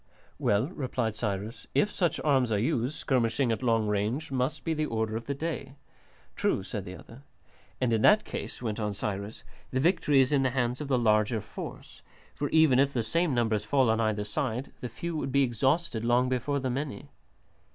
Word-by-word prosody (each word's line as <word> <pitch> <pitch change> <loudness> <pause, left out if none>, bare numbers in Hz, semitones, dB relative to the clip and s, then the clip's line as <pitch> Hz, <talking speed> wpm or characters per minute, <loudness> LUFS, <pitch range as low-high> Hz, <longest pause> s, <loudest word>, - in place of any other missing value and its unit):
"Well," 105 +4 +2
replied 125 - -2
Cyrus, 105 0 -4
"if 210 - +3
such 175 -3 0
arms 135 -5 +2
are 105 - +2
used, 125 +4 0
skirmishing 120 -1 +1
at 115 - -1
long 115 -3 +2
range 105 +9 -1
must 130 +2 -1
be 165 - 0
the 155 -1 -1
order 110 -1 -1
of 115 - -4
the 140 - -1
day." 140 -3 -4 0.6
"True," - - 0
said 100 0 -5
the 90 - -7
other. 115 - -13 0.6
"And 125 -3 +1
in 110 - +2
that 210 - +5
case," - - -6
went 110 -1 -2
on 105 -2 -2
Cyrus, 100 +1 -4 0.3
"the 130 - -1
victory 150 -2 +3
is 130 +1 +4
in 140 -2 +3
the 130 - +2
hands 125 +1 -1
of 150 - -4
the 135 -2 +2
larger 110 -1 +2
force; - - -9 0.3
for 145 0 -3
even 160 -5 +5
if 140 +1 +3
the 120 - 0
same 165 +4 +1
numbers 110 -3 +1
fall 130 +1 +3
on 110 0 +1
either 110 -2 0
side, 120 +4 -3
the 125 - -4
few 165 +9 -5
would 135 - -3
be 140 +1 +4
exhausted 130 +1 0
long 120 +2 +3
before 130 +3 0
the 130 -1 -2
many." 135 -4 -4
125 Hz, 200 wpm, -29 LUFS, 110-140 Hz, 0.6 s, that